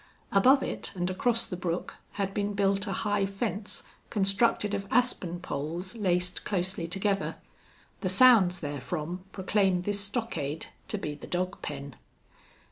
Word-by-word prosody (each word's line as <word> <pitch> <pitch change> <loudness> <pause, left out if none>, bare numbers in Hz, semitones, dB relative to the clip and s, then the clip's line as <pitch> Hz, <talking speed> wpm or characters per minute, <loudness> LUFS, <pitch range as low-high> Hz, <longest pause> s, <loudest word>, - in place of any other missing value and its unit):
Above 260 +8 +5
it, - - -3
and 180 0 -1
across 230 +5 +2
the 180 - -5
brook, 175 0 -3 0.2
had 195 -1 -2
been 205 0 -1
built 200 +1 +2
a - - -2
high 205 -1 +1
fence 200 +1 -2 0.3
constructed 205 +1 +2
of 200 -1 -2
aspen 205 -8 +2
poles 170 +5 -4
laced 180 -4 0
closely 185 -3 -1
together. 195 +3 0 0.6
The 185 - -1
sounds 195 -4 +6
therefrom 150 +5 -4
proclaimed 190 -1 +1
this 205 +1 0
stockade 200 - -1 0.2
to 210 - -2
be 150 -6 -4
the 145 - -10
dog 185 +1 -2
pen. 140 -3 -6
195 Hz, 140 wpm, -29 LUFS, 175-205 Hz, 0.6 s, sounds